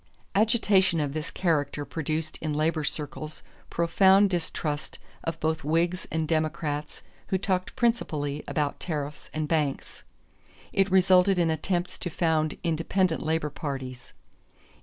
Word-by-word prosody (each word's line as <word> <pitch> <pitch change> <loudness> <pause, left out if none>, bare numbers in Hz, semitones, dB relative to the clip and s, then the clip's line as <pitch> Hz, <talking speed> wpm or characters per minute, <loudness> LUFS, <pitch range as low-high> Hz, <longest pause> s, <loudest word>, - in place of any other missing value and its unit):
Agitation 200 -5 +3
of 145 -2 -1
this 155 +1 -3
character 155 -5 0
produced 155 0 -3
in 155 -1 -1
labor 155 +1 +1
circles 150 +1 -4 0.3
profound 190 +4 +4
distrust 155 -3 -2 0.3
of 165 0 -3
both 160 -1 -1
Whigs 170 +4 0
and 160 -1 0
Democrats 155 -1 -2 0.2
who 190 - +1
talked 185 -1 -1
principally 150 - 0
about 145 -2 -1
tariffs 150 -3 -4
and 155 -1 -2
banks; 150 -4 -1 0.7
it 195 0 +3
resulted 185 0 +5
in 170 -2 +3
attempts 175 +3 -1
to 175 - -3
found 160 -2 +1
independent 165 +1 +1
labor 155 -1 0
parties. 135 -4 -6
160 Hz, 125 wpm, -27 LUFS, 150-180 Hz, 0.7 s, resulted